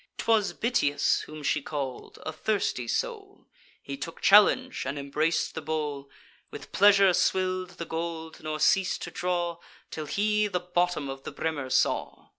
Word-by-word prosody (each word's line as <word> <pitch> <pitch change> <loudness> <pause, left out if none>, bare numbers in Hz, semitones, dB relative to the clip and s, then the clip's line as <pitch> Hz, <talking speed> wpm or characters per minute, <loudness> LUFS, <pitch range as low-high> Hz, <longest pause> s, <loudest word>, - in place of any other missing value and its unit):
'Twas 220 -3 +2
Bitias 145 - +1
whom 155 -1 -9
she 145 - +1
call'd, 140 -3 -5
a 155 - -2
thirsty 155 - -1
soul; - - -4 0.4
He 140 0 -6
took 165 +4 -6
the - - -19
challenge, 235 +6 +5
and 140 +2 -4
embrac'd 155 +4 0
the 160 - -5
bowl, 150 -2 -3 0.4
With - - -10
pleasure 200 -1 +6
swill'd 185 0 0
the 170 - -5
gold, 160 0 -5
nor 155 0 -4
ceas'd 190 +3 +2
to - - -6
draw, 175 -1 -2 0.3
Till 155 -1 -5
he 210 +4 +1
the 180 -3 -1
bottom 175 -4 0
of 135 0 -6
the - - -6
brimmer 145 -5 -3
saw. - - 0
165 Hz, 160 wpm, -27 LUFS, 145-190 Hz, 0.4 s, pleasure